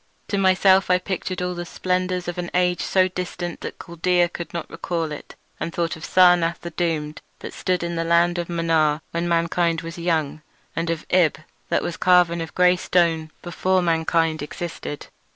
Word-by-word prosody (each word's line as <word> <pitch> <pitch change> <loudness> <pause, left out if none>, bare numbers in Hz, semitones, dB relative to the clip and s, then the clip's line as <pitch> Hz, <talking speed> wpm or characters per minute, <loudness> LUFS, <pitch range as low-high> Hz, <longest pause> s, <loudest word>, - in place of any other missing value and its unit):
To 200 - 0
myself 190 0 +4
I 180 - +5
pictured 185 -1 -4
all 180 0 -2
the 175 0 -5
splendours 180 0 -2
of 175 0 -4
an 175 -1 -3
age 180 -1 +2
so 185 -1 +3
distant 180 -1 -5
that - - -6
Chaldaea 175 +1 +1
could 170 0 -7
not 170 -2 -5
recall 165 -3 -3
it, 150 - -9 0.2
and 165 - -3
thought 170 0 -2
of 160 - -12
Sarnath 175 -2 +4
the 170 - -6
Doomed, 155 -3 -2 0.2
that - - -7
stood 180 -2 -1
in 170 0 -3
the 165 - 0
land 170 +1 +3
of 175 - -4
Mnar 160 -3 +1
when 170 +1 -2
mankind 170 0 +1
was 165 +1 -8
young, 160 -3 -1 0.3
and 165 0 -2
of 165 -2 -3
Ib, 180 -4 +3 0.3
that - - +1
was 170 - -4
carven 175 -2 +4
of 165 - -7
grey 180 0 +4
stone 165 -3 +1
before 185 +1 0
mankind 165 -1 +1
existed. 150 -1 -6
170 Hz, 185 wpm, -23 LUFS, 165-180 Hz, 0.3 s, I